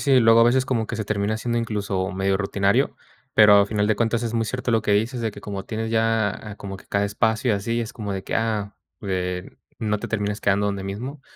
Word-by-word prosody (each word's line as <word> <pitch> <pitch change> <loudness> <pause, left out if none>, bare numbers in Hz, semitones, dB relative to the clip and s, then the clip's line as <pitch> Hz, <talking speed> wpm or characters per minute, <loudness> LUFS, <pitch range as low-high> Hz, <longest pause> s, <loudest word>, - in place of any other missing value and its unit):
sí. - - +7
Luego 115 0 +6
a - - +7
veces 130 +2 +3
como 115 -4 -1
que 120 - -4
se 110 -2 -3
termina 105 +1 0
haciendo 120 +1 -2
incluso 100 -4 -2
medio 95 0 0
rutinario, 100 0 +1 0.4
pero 105 -1 +7
a 100 - +4
final 105 -1 0
de 110 -1 +2
cuentas, 115 +1 0
es 115 - -3
muy 115 -1 +1
cierto 125 +1 -2
lo 110 -1 +3
que 105 - 0
dices, 115 +4 0
de 110 - 0
que 100 - -11
como 100 -1 -6
tienes 110 0 -3
ya, 115 -2 +2
ah, 105 +1 -8
como 95 -2 -7
que - - -17
cada 100 0 +1
espacio 110 +3 +1
y - - +2
así, 115 +4 -2
es 115 - -6
como 105 -3 -5
de 95 -1 -4
que - - -6
ah, 110 -3 -1 0.3
eh, 90 -2 -3 0.3
no 105 -2 -1
te - - -5
termines 105 -2 -2
quedando 100 0 +2
donde 100 -1 -2
mismo. 125 +9 -6
105 Hz, 250 wpm, -23 LUFS, 100-115 Hz, 0.4 s, sí